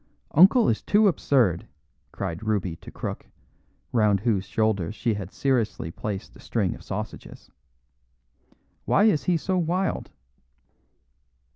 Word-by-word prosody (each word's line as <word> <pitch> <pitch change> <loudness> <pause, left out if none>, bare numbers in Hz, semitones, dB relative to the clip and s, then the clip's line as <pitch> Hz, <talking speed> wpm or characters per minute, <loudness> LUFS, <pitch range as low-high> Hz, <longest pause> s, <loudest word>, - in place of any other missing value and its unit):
"Uncle 195 - +6
is 110 - +1
too 210 +1 +4
absurd," 125 - +2 0.4
cried 85 +3 -4
Ruby 100 -6 -1
to - - -12
Crook, - - -6 0.7
round 105 -4 +3
whose 105 -4 0
shoulders 110 -3 0
she 115 0 0
had 100 -2 -6
seriously 120 - -1
placed 100 +2 -6
a - - -15
string - - -1
of - - -12
sausages. - - -7 1.3
"Why 200 - +3
is 165 -11 +3
he 175 -2 +2
so 185 +3 -1
wild?" 180 +3 -1
110 Hz, 125 wpm, -25 LUFS, -, 1.3 s, Uncle